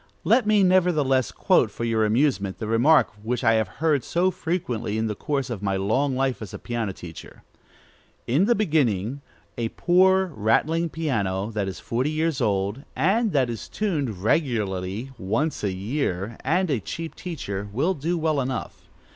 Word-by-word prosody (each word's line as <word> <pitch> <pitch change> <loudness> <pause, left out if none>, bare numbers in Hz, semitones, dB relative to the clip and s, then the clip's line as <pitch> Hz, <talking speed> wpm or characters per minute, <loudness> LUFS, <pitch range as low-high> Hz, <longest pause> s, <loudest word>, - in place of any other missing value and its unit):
Let 245 -5 +3
me 210 -2 +4
nevertheless 155 - +3
quote - - +3
for - - -6
your 115 -2 +2
amusement 105 -4 +1
the 110 - -5
remark 120 +9 +4
which 120 +3 -2
I 115 - +5
have 110 -2 +2 0.2
heard 150 -6 +3
so 180 +2 +1
frequently 125 - -2
in 110 - 0
the 110 - -1
course 135 +3 -2
of 110 -5 -4
my 100 -1 0
long 130 +8 +1
life 130 -2 0
as 105 - -7
a - - -5
piano 115 -4 -3
teacher: 85 -3 -11 0.8
"In 145 +11 +2
the 240 +2 +3
beginning, 140 - 0 0.4
a 115 -1 -1
poor, 190 +3 +3
rattling 155 +11 +1
piano, 110 -11 -1
that 105 -3 -2
is 95 - -5
forty 125 +5 -1
years 155 -1 -1
old, 100 +4 0
and 200 - +2
that 135 -4 +3
is 115 -2 -6
tuned 145 - -2
regularly 110 - -1
once 115 +12 -1
a 100 - +1
year, 100 0 -2
and 175 +5 +1
a 130 - +1
cheap 160 - -6
teacher, 105 - -5
will 145 - +1
do 170 +2 -2
well 155 -3 +1
enough. 130 -2 -5
130 Hz, 170 wpm, -24 LUFS, 105-160 Hz, 0.8 s, I